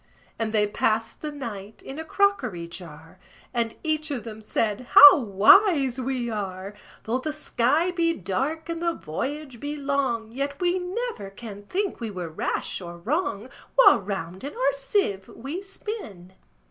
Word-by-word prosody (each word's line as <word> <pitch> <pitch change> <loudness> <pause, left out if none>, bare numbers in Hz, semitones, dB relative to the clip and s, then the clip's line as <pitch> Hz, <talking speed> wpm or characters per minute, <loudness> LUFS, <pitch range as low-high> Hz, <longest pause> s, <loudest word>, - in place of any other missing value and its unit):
And 225 -1 -1
they 210 -1 +3
passed 220 +2 -1
the 305 - -4
night 220 -7 -8
in 275 +3 -7
a - - -4
crockery 280 - 0
jar; 165 -2 -11 0.3
And 235 -2 -1
each 310 -1 0
of 260 -6 -3
them 220 -1 -8
said, 215 +2 -1
"How 290 0 +11
wise 260 - +5
we 255 -1 -2
are! 195 -3 -4 0.3
Though 235 +3 -1
the 310 +4 -3
sky 300 +3 +1
be 335 -1 +1
dark, 270 - -2
and 335 0 -4
the 340 -1 +1
voyage 270 - -5
be 290 +3 -4
long, 275 -6 -1
Yet 280 +3 -3
we 360 +1 +1
never 370 - -4
can 205 0 -10
think 395 +1 -2
we 230 -2 -4
were 180 -4 -5
rash 160 - -3
or 175 -1 -8
wrong, 240 - -2 0.3
While - - +7
round 190 -1 -5
in 285 - -6
our 270 +2 +2
sieve 275 - -1
we 285 +10 -6
spin." 385 - -8
250 Hz, 160 wpm, -25 LUFS, 205-310 Hz, 0.3 s, How